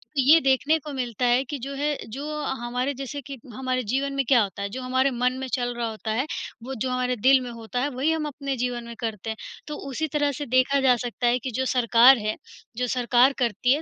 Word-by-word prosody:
तो 275 - +3
ये 295 +5 +7
देखने 275 +3 +3
को 300 0 -8
मिलता 245 -3 -2
है 245 +2 +3
कि 280 +2 -5
जो 275 +3 -6
है, 290 +1 -1
जो 300 +6 -5
हमारे 250 +2 -2
जैसे 275 +2 -6
कि 275 +1 -8 0.2
हमारे 255 +1 -2
जीवन 275 +2 0
में 275 0 0
क्या 245 -1 +5
होता 200 0 -6
है? 200 - -3
जो 255 +6 -6
हमारे 260 +2 +1
मन 250 +1 +1
में 265 - -4
चल 245 -2 0
रहा 235 -1 -2
होता 220 0 -5
है, 240 +5 0 0.4
वो 265 +2 -5
जो 255 +2 -2
हमारे 250 0 0
दिल 260 +4 +5
में 250 - -6
होता 230 +1 -5
है, 285 - 0
वही 275 +4 0
हम 320 -1 -1
अपने 280 -1 -4
जीवन 245 0 -2
में 235 - -8
करते 225 -2 -4
हैं, 220 - -4 0.3
तो 300 - -4
उसी 315 +4 -2
तरह 290 -1 +2
से - - -2
देखा 255 +2 +3
जा 260 -2 +5
सकता 240 0 -1
है 245 +1 +3
कि 255 +2 -5
जो 260 - 0
सरकार 245 +1 +6
है, 215 -1 -2 0.4
जो 250 0 0
सरकार 245 +2 +3
करती 245 +1 +2
है, 295 - -1
255 Hz, 250 wpm, -25 LUFS, 240-275 Hz, 0.4 s, ये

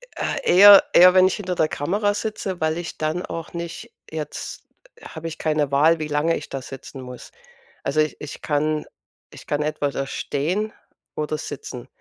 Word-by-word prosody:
Ah, - - -2
eher 200 +2 +9
eher, 180 +1 +8
wenn 185 0 +6
ich 190 - -1
hinter 185 -4 -4
der 160 - +2
Kamera 205 +9 0
sitze, 205 -3 -4
weil 160 +1 +1
ich 175 -1 -6
dann 155 +3 -2
auch 165 +1 -7
nicht 170 -1 -6 0.2
jetzt 155 -2 -6 0.4
habe 160 0 -8
ich 165 - -7
keine 150 -3 0
Wahl, 155 +4 +4
wie 155 - -3
lange 150 +3 +1
ich 150 - -9
da 135 - -5
sitzen 135 +1 -10
muss. 125 -1 -10 0.5
Also 140 +3 -1
ich 155 - -1
ich 150 - -8
kann 150 +1 0 0.5
ich - - -13
kann 145 0 0
etwa 150 -1 -1
da 135 0 -3
stehen 180 +13 -2 0.4
oder 155 0 -2
sitzen. 135 -4 -7
155 Hz, 180 wpm, -22 LUFS, 145-180 Hz, 0.5 s, eher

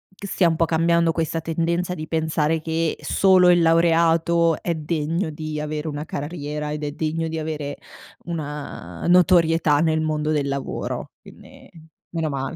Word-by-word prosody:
che 200 - -8
stia 180 -3 +2
un 160 - -1
po' 165 - +3
cambiando 165 0 +2
questa 165 0 -1
tendenza 170 +2 -1
di 155 - -6
pensare 160 0 0
che 160 0 -1
solo 185 -2 +4
il 175 -1 +5
laureato 165 0 +3
è 170 - -1
degno 160 +2 -2
di 155 0 -5
avere 150 +1 -4
una 150 0 -4
carriera 150 -1 -5
ed 150 - -5
è 145 - -2
degno 160 +2 -2
di 160 0 -3
avere 150 -2 -4 0.5
una 150 - -6
notorietà 165 -4 +4
nel 160 0 +2
mondo 155 -1 -1
del 145 -2 0
lavoro, 140 -1 -4
quindi - - -16 0.4
meno 165 -2 -2
male. 135 -1 -4
160 Hz, 160 wpm, -22 LUFS, 150-170 Hz, 0.5 s, il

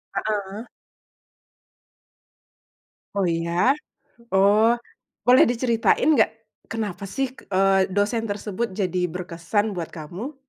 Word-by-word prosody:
Heeh. 210 +1 -3 2.5
Oh, 195 -3 +1
iya? 170 - +1 0.6
Oh, 210 +4 +5 0.5
boleh 250 +1 +6
diceritain 240 +4 +2
gak? 220 - +5 0.4
Kenapa 210 -3 -4
sih, 270 +6 -2
eee, 195 -5 +2
dosen 205 +4 0
tersebut 205 0 -3
jadi 180 -3 0
berkesan 180 +4 -2
buat 170 -2 -5
kamu? 175 - -7
205 Hz, 90 wpm, -23 LUFS, 185-230 Hz, 2.5 s, boleh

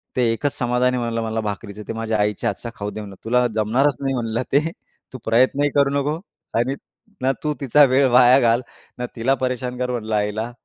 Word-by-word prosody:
ते 125 - +2
एकच 145 +5 -2
समाधान 125 +1 +1
आहे 125 - -1
म्हणलं 115 -1 -2
मला 110 0 -2
भाकरीचं, 105 0 -5
ते - - -3
माझ्या 110 -1 -1
आईच्या 105 -1 0
हातचं 110 +4 -5
खाऊ 100 0 -4
दे 110 - -6
म्हणलं. 100 -2 -9
तुला 125 +2 +3
जमणारच 120 +6 +2
नाही 135 -1 0
म्हणलं 115 0 -2
ते. 140 - +6 0.5
तू 130 - -5
प्रयत्नही 130 +5 +3
करू 140 -1 +4
नको 150 +3 -1 0.4
आणि 130 +3 0 0.5
ना 130 +1 +2
तू 150 - 0
तिचा 140 +3 +5
वेळ 135 +1 +3
वाया 125 +1 +7
घाल, 120 0 +3 0.4
ना 125 - -3
तिला 120 +4 +1
परेशान 125 -1 -2
कर 125 0 -1
म्हटलं 110 -3 -2
आईला, 105 +3 -1
120 Hz, 205 wpm, -21 LUFS, 110-130 Hz, 0.5 s, वाया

